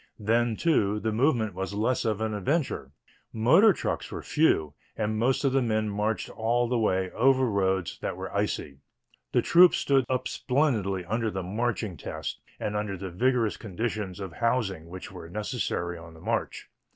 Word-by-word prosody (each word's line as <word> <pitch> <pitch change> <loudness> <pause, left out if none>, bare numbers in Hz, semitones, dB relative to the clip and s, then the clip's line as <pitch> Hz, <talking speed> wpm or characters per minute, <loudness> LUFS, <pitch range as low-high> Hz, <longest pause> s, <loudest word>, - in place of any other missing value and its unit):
Then, 115 +2 +1
too, 105 -9 +2
the 110 +1 -1
movement 115 -3 +1
was 95 +2 -4
less 115 +4 0
of 110 -1 0
an 110 -1 -1
adventure. 120 - -1 0.4
Motor 160 - +6
trucks - - -3
were - - -6
few 80 - +2 0.2
and 110 0 -1
most 125 +5 +2
of 135 - +2
the 135 - +3
men 110 -2 0
marched 105 +2 -1
all 120 +2 +1
the 120 0 0
way 95 -4 +1
over 130 +2 +3
roads 95 -5 0
that - - -4
were - - -6
icy. 70 -1 -2 0.5
The - - +2
troops 175 +1 +6
stood 135 -3 +2
up 130 0 0
splendidly 110 - 0
under 110 +4 -1
the 95 -2 -4
marching 105 -1 -2
test - - -5 0.2
and 105 - -3
under 105 -2 -2
the 95 0 -6
rigorous 120 +3 +1
conditions 105 -2 -4
of 95 -4 -6
housing 105 -8 -1
which 95 +3 -8
were 90 -3 -9
necessary 105 -5 -3
on 85 0 -12
the - - -14
march. 110 +5 -3
110 Hz, 175 wpm, -27 LUFS, 95-120 Hz, 0.5 s, Motor